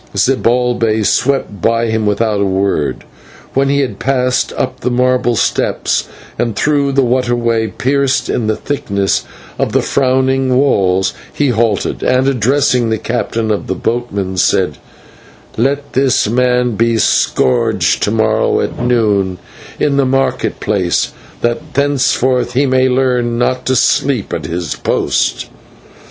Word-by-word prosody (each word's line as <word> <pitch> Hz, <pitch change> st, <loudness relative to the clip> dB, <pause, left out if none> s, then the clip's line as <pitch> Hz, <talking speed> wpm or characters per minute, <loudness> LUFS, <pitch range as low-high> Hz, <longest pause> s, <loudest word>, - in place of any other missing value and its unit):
Zibalbay 120 Hz, -4 st, +1 dB
swept 125 Hz, -8 st, 0 dB
by 115 Hz, +3 st, +1 dB
him 110 Hz, -1 st, 0 dB
without 105 Hz, 0 st, 0 dB
a -, -, +2 dB
word. 95 Hz, -6 st, -1 dB, 0.5 s
When 135 Hz, +1 st, +1 dB
he 140 Hz, 0 st, +2 dB
had 115 Hz, -7 st, -3 dB
passed 125 Hz, -2 st, 0 dB
up -, -, -2 dB
the 125 Hz, -, -1 dB
marble 125 Hz, -1 st, +1 dB
steps, -, -, 0 dB, 0.3 s
and 115 Hz, -3 st, -1 dB
through 140 Hz, +2 st, +1 dB
the 135 Hz, 0 st, +3 dB
water 125 Hz, 0 st, +1 dB
way, 115 Hz, -2 st, 0 dB
pierced 135 Hz, +3 st, 0 dB
in 115 Hz, -, -1 dB
the 110 Hz, -, +1 dB
thickness 100 Hz, -9 st, -1 dB, 0.3 s
of -, -, -1 dB
the -, -, +2 dB
frowning 130 Hz, 0 st, +1 dB
walls, 95 Hz, -8 st, +2 dB, 0.2 s
he 145 Hz, -2 st, 0 dB
halted, 115 Hz, -4 st, 0 dB
and, 130 Hz, +1 st, +2 dB
addressing 125 Hz, -1 st, +1 dB
the 110 Hz, -, 0 dB
captain 115 Hz, -1 st, -2 dB
of 105 Hz, -, -2 dB
the 95 Hz, -, -2 dB
boatmen, 100 Hz, -4 st, -3 dB
said: -, -, +1 dB, 0.8 s
"Let 140 Hz, +4 st, -1 dB
that 130 Hz, -4 st, +2 dB
man 125 Hz, 0 st, +2 dB
be 115 Hz, +1 st, +1 dB
scourged 65 Hz, -10 st, +1 dB
to -, -, +1 dB
morrow 110 Hz, 0 st, +1 dB
at -, -, -3 dB
noon 105 Hz, -6 st, +1 dB, 0.4 s
in 140 Hz, -1 st, +1 dB
the 140 Hz, -, +3 dB
market 135 Hz, +1 st, 0 dB
place, 95 Hz, -5 st, 0 dB, 0.3 s
that 120 Hz, +4 st, 0 dB
henceforth 130 Hz, -3 st, +1 dB
he 135 Hz, +3 st, +2 dB
may 130 Hz, -1 st, +2 dB
learn 125 Hz, -2 st, +1 dB
not 125 Hz, +1 st, -1 dB
to 130 Hz, -, +2 dB
sleep 125 Hz, -3 st, +1 dB
at 80 Hz, -4 st, -3 dB
his 85 Hz, -1 st, -3 dB
post!" -, -, -1 dB
120 Hz, 145 wpm, -14 LUFS, 110-130 Hz, 0.8 s, the